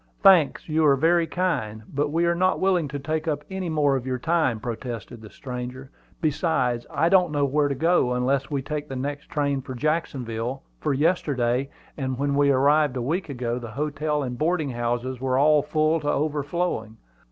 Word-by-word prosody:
"Thanks; 185 Hz, -7 st, +5 dB
you 160 Hz, 0 st, +1 dB
are 140 Hz, -, +6 dB
very 165 Hz, +4 st, +3 dB
kind. 110 Hz, -, -2 dB
But 145 Hz, +1 st, -1 dB
we 165 Hz, +2 st, +2 dB
are 170 Hz, -, +3 dB
not 185 Hz, +2 st, +1 dB
willing 185 Hz, -5 st, +2 dB
to 145 Hz, +1 st, -5 dB
take 155 Hz, +3 st, -3 dB
up 150 Hz, -2 st, -1 dB
any 190 Hz, -2 st, -3 dB
more 150 Hz, -3 st, +2 dB
of 130 Hz, -1 st, -3 dB
your 130 Hz, -1 st, -1 dB
time," 145 Hz, -5 st, +1 dB
protested 120 Hz, 0 st, -6 dB
the 110 Hz, -, -11 dB
stranger. 125 Hz, +2 st, -7 dB, 0.3 s
"Besides, 140 Hz, -6 st, 0 dB
I 160 Hz, -, +1 dB
don't 180 Hz, -2 st, +4 dB
know 145 Hz, -1 st, +1 dB
where 145 Hz, +2 st, +2 dB
to 140 Hz, -, -2 dB
go, 160 Hz, -3 st, +2 dB
unless 135 Hz, +2 st, 0 dB
we 140 Hz, -2 st, -2 dB
take 150 Hz, +1 st, -4 dB
the 135 Hz, -, -5 dB
next 145 Hz, +3 st, -4 dB
train 140 Hz, -2 st, 0 dB
for 130 Hz, 0 st, -7 dB
Jacksonville; 130 Hz, -4 st, -2 dB, 0.2 s
for 150 Hz, -, -1 dB
yesterday, 135 Hz, -4 st, +1 dB, 0.3 s
and 130 Hz, -3 st, -2 dB
when 140 Hz, +1 st, 0 dB
we 140 Hz, 0 st, +3 dB
arrived 140 Hz, 0 st, +3 dB
a -, -, -2 dB
week 160 Hz, +6 st, -2 dB
ago, 125 Hz, -2 st, -2 dB
the 120 Hz, -2 st, -7 dB
hotels 150 Hz, +3 st, -2 dB
and 125 Hz, -1 st, -5 dB
boarding 155 Hz, -3 st, 0 dB
houses 120 Hz, +1 st, -2 dB
were 130 Hz, -1 st, +1 dB
all 150 Hz, +1 st, +5 dB
full 155 Hz, +2 st, +1 dB
to 145 Hz, -1 st, -2 dB
overflowing. 145 Hz, -6 st, -1 dB
145 Hz, 190 wpm, -24 LUFS, 130-155 Hz, 0.3 s, are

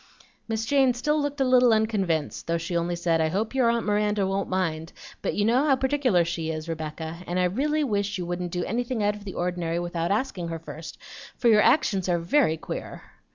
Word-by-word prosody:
Miss 225 Hz, 0 st, -2 dB
Jane 265 Hz, -2 st, +3 dB
still 300 Hz, +5 st, 0 dB
looked 285 Hz, -1 st, -2 dB
a -, -, +4 dB
little 250 Hz, -1 st, +5 dB
unconvinced, 200 Hz, -8 st, 0 dB
though 170 Hz, 0 st, +1 dB
she 165 Hz, +1 st, -4 dB
only 170 Hz, +1 st, 0 dB
said, 170 Hz, -1 st, +1 dB
"I 160 Hz, -, +2 dB
hope 210 Hz, +8 st, -2 dB
your 255 Hz, -3 st, +3 dB
aunt 235 Hz, -1 st, 0 dB
Miranda 210 Hz, -1 st, +1 dB
won't 195 Hz, +1 st, -1 dB
mind, 165 Hz, -4 st, -2 dB, 0.3 s
but -, -, -2 dB
you 205 Hz, -, +1 dB
know 245 Hz, +5 st, +3 dB
how 275 Hz, -, +5 dB
particular 260 Hz, -9 st, +2 dB
she 165 Hz, -1 st, -3 dB
is, 155 Hz, 0 st, -4 dB
Rebecca, 160 Hz, +1 st, -5 dB
and 175 Hz, -, -2 dB
I -, -, +3 dB
really 290 Hz, +12 st, +1 dB
wish 205 Hz, -5 st, -1 dB
you 180 Hz, -, -4 dB
wouldn't 175 Hz, 0 st, -3 dB
do 175 Hz, 0 st, -2 dB
anything 240 Hz, 0 st, -2 dB
out 205 Hz, 0 st, +1 dB
of 210 Hz, 0 st, -12 dB
the 195 Hz, -, -6 dB
ordinary 175 Hz, -1 st, -2 dB
without 175 Hz, -1 st, -2 dB
asking 200 Hz, -5 st, -1 dB
her 165 Hz, 0 st, -4 dB
first, 160 Hz, 0 st, -9 dB, 0.4 s
for 240 Hz, -, +3 dB
your 210 Hz, -2 st, +6 dB
actions 195 Hz, -, +2 dB
are 175 Hz, -, +3 dB
very 170 Hz, -, +2 dB
queer." -, -, -7 dB
195 Hz, 215 wpm, -26 LUFS, 170-235 Hz, 0.4 s, your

